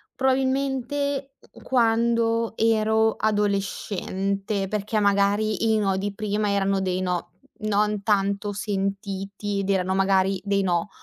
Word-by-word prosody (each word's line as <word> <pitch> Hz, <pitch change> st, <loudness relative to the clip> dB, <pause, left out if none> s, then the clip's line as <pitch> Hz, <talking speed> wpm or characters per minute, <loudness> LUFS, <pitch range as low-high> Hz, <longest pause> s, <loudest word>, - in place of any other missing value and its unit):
probabilmente, 270 Hz, +1 st, 0 dB, 0.2 s
mh -, -, -22 dB
mhmm, -, -, -17 dB
quando 230 Hz, -1 st, +2 dB
ero 220 Hz, 0 st, +3 dB
adolescente, 200 Hz, -1 st, -1 dB
perché, 210 Hz, +2 st, -1 dB
magari, 205 Hz, +2 st, +2 dB
i 220 Hz, -, +3 dB
no 195 Hz, -2 st, +1 dB
di 200 Hz, +1 st, -3 dB
prima 210 Hz, 0 st, -1 dB
erano 195 Hz, -1 st, +1 dB
dei 185 Hz, -1 st, -1 dB
no, 180 Hz, -2 st, -2 dB, 0.3 s
non 210 Hz, -1 st, 0 dB
tanto 200 Hz, 0 st, 0 dB
sentiti, 200 Hz, 0 st, -3 dB
ed 195 Hz, 0 st, -3 dB
erano 190 Hz, -1 st, +1 dB
magari 190 Hz, 0 st, +2 dB
dei 200 Hz, -1 st, +1 dB
no 175 Hz, +1 st, 0 dB
205 Hz, 125 wpm, -24 LUFS, 195-220 Hz, 0.3 s, ero